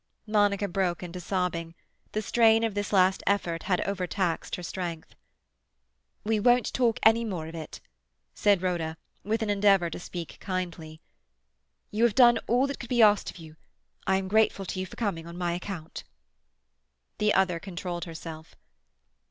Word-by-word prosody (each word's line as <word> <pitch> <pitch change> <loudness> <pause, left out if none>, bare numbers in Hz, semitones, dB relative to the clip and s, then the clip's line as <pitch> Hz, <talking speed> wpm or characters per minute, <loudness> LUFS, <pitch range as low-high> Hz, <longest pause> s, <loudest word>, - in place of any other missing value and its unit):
Monica 205 -2 +2
broke 180 -2 -1
into 180 +1 -6
sobbing. 170 -2 -2 0.4
The 215 - -1
strain 225 +1 +4
of 225 -2 0
this 205 0 -3
last 190 -1 +4
effort 175 -5 0
had 180 - +2
overtaxed 185 -2 -1
her 180 - -8
strength. 170 -2 -5 1.1
"We 215 0 +1
won't 245 +3 +3
talk 235 -3 +2
any 225 +1 +5
more 185 -8 -4
of 160 - -8
it," 160 -2 -7 0.5
said 200 -3 +2
Rhoda, 165 -3 -1 0.3
with 220 +2 -1
an 210 - 0
endeavour 195 -4 +3
to - - -6
speak 175 -2 -7
kindly. 170 -4 -5 0.9
"You 215 +2 0
have 235 -3 +3
done 240 -2 +6
all 245 +3 +3
that 280 0 -4
could 240 - -8
be 240 -2 +4
asked 205 -1 +4
of - - -10
you. 160 -2 -12 0.5
I 190 0 +3
am 190 0 -3
grateful 210 -1 +2
to 185 - -4
you 185 - -3
for - - -12
coming 180 -8 -3
on 170 +1 -9
my 175 -1 -1
account." 175 -2 -6 1.2
The 210 0 +3
other 185 -3 +2
controlled 175 -2 -5
herself. 160 -1 -9
190 Hz, 165 wpm, -27 LUFS, 170-210 Hz, 1.2 s, done